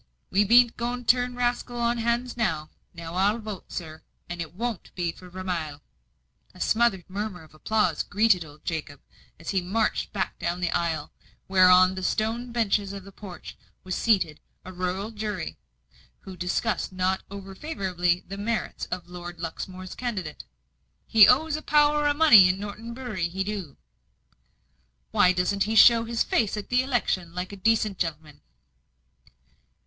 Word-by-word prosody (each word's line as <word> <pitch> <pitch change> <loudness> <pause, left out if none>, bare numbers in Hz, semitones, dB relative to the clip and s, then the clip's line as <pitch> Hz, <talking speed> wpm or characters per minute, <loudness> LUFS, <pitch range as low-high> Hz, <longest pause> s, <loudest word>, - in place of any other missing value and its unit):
We 200 +2 +4
bean't 235 +3 +5
going 245 +1 -3
to 245 - +6
turn 245 0 -3
rascals 245 0 -1
on's 235 0 0
hands 235 +2 -1
now. 160 -10 -1 0.2
Now 165 -1 -8
I'll 200 +4 +2
vote, 215 -4 -8
sir, 160 -2 -7 0.3
and 175 -1 -5
it 170 +1 -7
won't 230 -1 -4
be 175 -2 -1
for 180 +2 -14
Vermilye." 175 -5 -4 0.8
A - - -14
smothered 220 -6 +1
murmur 195 -2 -5
of 155 - -19
applause 180 0 0
greeted 205 -4 +2
old 150 -1 -16
Jacob, 150 -4 -4 0.4
as 165 - -5
he 190 -2 +1
marched 210 +5 -1
back 195 -2 -3
down 170 +1 -2
the 175 -2 -1
aisle, 165 -3 -1 0.3
where 185 -1 +5
on 185 +1 +6
the 190 - -5
stone 225 +5 -1
benches 205 -4 0
of 200 -1 -7
the 200 - -12
porch 185 -4 -10 0.3
was 185 - -4
seated 185 -10 +1 0.3
a 185 - -8
rural 185 +4 -3
jury, 210 - -5 0.6
who 190 - -10
discussed 180 +4 -1
not 185 0 0
over 195 -1 -8
favourably 185 - -1
the 195 +1 -7
merits 220 +2 -3
of 180 -1 -5
Lord 175 -1 -9
Luxmore's 185 +3 -6
candidate. 200 -11 -5 0.6
"He 220 -3 +7
owes 295 +4 +4
a 310 - -4
power 295 0 +3
o' 290 - +3
money 245 -12 +8
in 185 +1 0
Norton 215 +3 -7
Bury 225 -9 -3
he 190 +2 -2
do." 195 -8 -5 1.3
"Why 180 - +5
doesn't 185 +2 0
he 220 +1 -2
show 230 +1 +7
his 230 0 0
face 215 -2 0
at 205 - -6
the 255 +1 +2
'lection, 185 -9 -1
like 180 +1 -4
a - - -7
decent 215 -1 +1
gen'leman?" 155 -3 -4
195 Hz, 165 wpm, -26 LUFS, 180-230 Hz, 1.3 s, money